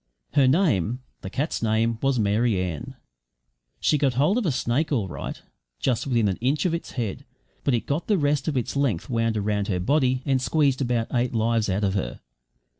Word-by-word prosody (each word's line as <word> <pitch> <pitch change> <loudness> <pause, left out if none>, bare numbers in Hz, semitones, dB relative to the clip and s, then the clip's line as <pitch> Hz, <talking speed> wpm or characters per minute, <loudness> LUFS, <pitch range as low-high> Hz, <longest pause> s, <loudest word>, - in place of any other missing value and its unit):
Her 135 -2 +5
name 130 - +2 0.2
the 95 - -6
cat's 145 +10 -2
name 110 +1 +1
was 135 -1 +2
Mary 105 0 +2
Ann. 90 -5 -4 0.8
She 150 - +2
got 135 -3 +1
hold 150 - +3
of - - -2
the 170 - +1
snake 135 +5 0
all 115 -9 +1
right, 70 -6 -6 0.4
just 125 0 0
within 120 -5 +2
an 95 - -1
inch 135 +7 0
of 175 - +1
its 170 - -4
head; 115 -6 -3 0.4
but 135 - +2
it 115 - -2
got 150 +4 -2
the 210 - +3
rest 145 -2 +1
of 150 -4 0
its 125 +2 -2
length 135 -9 0
wound 115 -1 +1
round 105 -1 0
her 90 -4 0
body 130 +4 +1
and 135 -2 +2
squeezed 140 -2 +2
about 120 -3 -1
eight 120 -1 0
lives 115 -1 +1
out 95 +3 0
of 95 -1 +1
her. 95 - -3
120 Hz, 200 wpm, -25 LUFS, 110-140 Hz, 0.8 s, Her